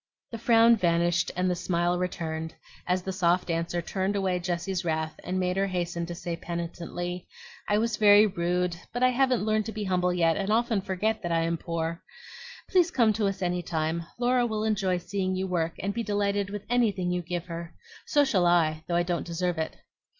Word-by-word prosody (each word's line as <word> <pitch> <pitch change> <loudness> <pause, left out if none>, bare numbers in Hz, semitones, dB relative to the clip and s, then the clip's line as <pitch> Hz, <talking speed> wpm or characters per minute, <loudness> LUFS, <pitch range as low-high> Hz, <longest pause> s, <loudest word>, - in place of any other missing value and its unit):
The 230 - -5
frown 230 0 +5
vanished 175 -1 +2
and 180 +1 +1
the 180 - +2
smile 175 0 0
returned 160 -3 -3 0.3
as 180 0 +1
the 190 - -3
soft 180 -1 +1
answer 170 +1 -1
turned 190 +4 -1
away 190 -2 0
Jessie's 175 +1 -2
wrath 160 -2 -2
and 185 +1 -2
made 180 0 0
her 195 0 +2
hasten 175 -2 -2
to 175 - -5
say 170 0 -4
penitently, 175 +1 -5 0.4
"I 205 - +3
was 225 0 0
very 205 0 +7
rude; 180 -2 0 0.2
but 245 +1 -1
I 255 - +6
haven't 255 -3 +2
learned 215 0 +1
to - - -3
be 215 -1 -4
humble 180 -2 +1
yet, 165 -2 +2
and 195 0 -2
often 225 -1 +2
forget 205 +3 -1
that 175 -3 -3
I 165 0 +2
am 165 0 0
poor. 165 0 -3 0.7
Please 360 -2 +3
come 235 -9 +3
to 210 -1 0
us 195 -1 -3
any 180 0 0
time. 165 0 -2
Laura 245 0 +2
will 215 -1 -2
enjoy 195 -4 +1
seeing 185 +1 -2
you 190 +1 -1
work, 170 -3 -1
and 200 +2 -2
be 235 - -2
delighted 205 -2 0
with 205 0 -6
anything 205 -7 +1
you 180 0 0
give 175 0 -4
her. 170 -1 -7 0.3
So 290 -1 +4
shall 190 -9 +2
I, 160 -3 +2
though 170 - -1
I 175 - +3
don't 175 -1 -1
deserve 175 0 -1
it." 160 - -3
180 Hz, 205 wpm, -27 LUFS, 170-205 Hz, 0.7 s, very